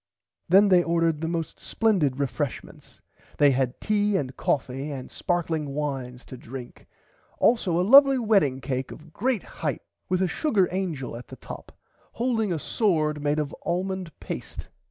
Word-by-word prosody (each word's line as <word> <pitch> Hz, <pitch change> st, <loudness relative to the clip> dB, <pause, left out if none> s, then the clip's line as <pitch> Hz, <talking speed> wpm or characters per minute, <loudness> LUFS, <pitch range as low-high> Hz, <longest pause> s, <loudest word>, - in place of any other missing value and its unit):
Then 200 Hz, +3 st, +6 dB
they 180 Hz, -2 st, +6 dB
ordered 165 Hz, -2 st, +1 dB
the 160 Hz, -, -1 dB
most 165 Hz, -1 st, -3 dB
splendid 180 Hz, -, +1 dB
refreshments 140 Hz, -, -4 dB, 0.4 s
they 145 Hz, -1 st, +6 dB
had 130 Hz, -1 st, -1 dB
tea 210 Hz, -1 st, +1 dB
and 130 Hz, -2 st, -3 dB
coffie 135 Hz, +1 st, -1 dB
and 130 Hz, -2 st, -7 dB
sparkling 160 Hz, -5 st, -2 dB
wines 135 Hz, -4 st, -4 dB
to 130 Hz, -, -9 dB
drink 125 Hz, +1 st, -10 dB, 0.5 s
also 195 Hz, -8 st, +2 dB
a 180 Hz, -, +2 dB
lovly 275 Hz, +2 st, +8 dB
wedding 200 Hz, -, +2 dB
cake 130 Hz, -1 st, -3 dB
of 160 Hz, 0 st, -12 dB
great 250 Hz, -2 st, 0 dB
height -, -, -4 dB, 0.3 s
with 185 Hz, +1 st, +2 dB
a -, -, +2 dB
sugar 200 Hz, -, +1 dB
angel 170 Hz, -11 st, -3 dB
at 120 Hz, +1 st, -9 dB
the -, -, -10 dB
top -, -, -10 dB, 0.4 s
holding 230 Hz, -4 st, 0 dB
a 170 Hz, -, 0 dB
sword 155 Hz, -5 st, 0 dB
made 145 Hz, +1 st, +1 dB
of 150 Hz, -2 st, -2 dB
almond 185 Hz, 0 st, -2 dB
paste. -, -, -7 dB
165 Hz, 155 wpm, -26 LUFS, 140-195 Hz, 0.5 s, lovly